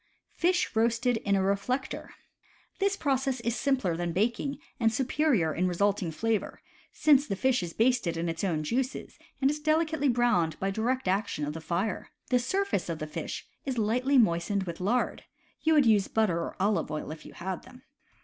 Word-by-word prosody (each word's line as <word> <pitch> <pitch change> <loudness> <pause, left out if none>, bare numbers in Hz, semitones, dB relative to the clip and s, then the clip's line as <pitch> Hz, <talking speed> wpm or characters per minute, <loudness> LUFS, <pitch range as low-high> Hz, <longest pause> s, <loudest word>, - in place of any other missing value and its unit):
Fish 355 -6 +1
Roasted 235 +2 +2
in 200 -2 0
a 190 - +2
Reflector. 225 +8 -1 0.4
— - - -33
This 400 0 +1
process 270 -4 0
is 235 0 -1
simpler 255 - +1
than 175 0 -2
baking, 235 - 0 0.2
and 225 -2 +3
superior 255 - +1
in 180 +2 +1
resulting 195 0 +1
flavor, 220 +7 -2 0.3
since 290 -2 +4
the 195 - -1
fish 255 +3 +2
is 170 -2 -5
basted 225 -8 +2
in 170 +1 -1
its 165 +1 -3
own 165 -5 0
juices, 255 - -3 0.2
and 270 - +5
is 300 - -4
delicately 310 -1 +1
browned 235 -10 +2
by 195 0 0
direct 240 +3 -1
action 190 -5 0
of 150 - -4
the 165 - -7
fire. 180 +5 -2 0.2
The 250 - +4
surface 380 - -1
of 165 - -2
the 155 - -4
fish 150 - -5 0.2
is 265 -3 -3
lightly 250 +6 +2
moistened 200 -2 +2
with 170 -2 -6
lard 235 +7 0 0.4
(you 320 0 +3
would 290 -3 +5
use 210 -4 +4
butter 210 -7 +1
or 170 - -4
olive 200 +2 +1
oil 155 0 -4
if 155 -1 -9
you - - -12
had 185 +1 -4
them). 255 0 -16
220 Hz, 190 wpm, -29 LUFS, 180-260 Hz, 0.4 s, and